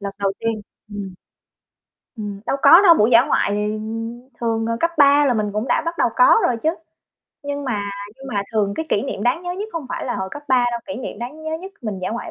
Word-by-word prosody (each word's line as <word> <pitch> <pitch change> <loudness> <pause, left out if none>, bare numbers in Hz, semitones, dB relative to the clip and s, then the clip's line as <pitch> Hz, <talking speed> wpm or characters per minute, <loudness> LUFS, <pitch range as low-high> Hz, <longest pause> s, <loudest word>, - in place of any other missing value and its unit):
Lần 200 -1 -5
đầu 195 -1 0
tiên, 225 -1 -2 0.3
ừm. 200 -3 -7 1.0
Ừm, 205 -2 -6
đâu 275 - 0
có 345 +5 +9
đâu, 340 -4 +8
buổi 220 -4 +3
dã 230 0 +7
ngoại 290 - +1
thì 210 +1 -1 0.6
thường 225 -1 0
là 230 - -1
cấp 335 - +2
3 285 0 +6
là 250 - +2
mình 210 -2 -1
cũng 215 +4 -2
đã - - +2
bắt 335 +1 -3
đầu - - +3
có - - +6
rồi 240 - 0
chứ, 315 - +2 0.7
nhưng 285 0 -4
mà 205 -6 -2 0.3
nhưng 270 0 -11
mà 200 - +1
thường 200 -2 +1
cái 320 - -3
kỷ 205 - +1
niệm 200 - -4
đáng 255 +10 +1
nhớ 355 - -3
nhất 410 +4 -5
hông 325 -5 -5
phải - - -4
là 245 - -2
hồi 190 -1 -3
cấp 290 - -8
3 255 -2 +4
đâu. 235 - -3
Kỷ 285 - -5
niệm 220 - -6
đáng 290 +7 -7
nhớ 315 - -3
nhất 385 +1 -9
mình 210 -4 -4
dã 185 - -3
ngoại 235 +2 -5
235 Hz, 250 wpm, -21 LUFS, 210-290 Hz, 1.0 s, có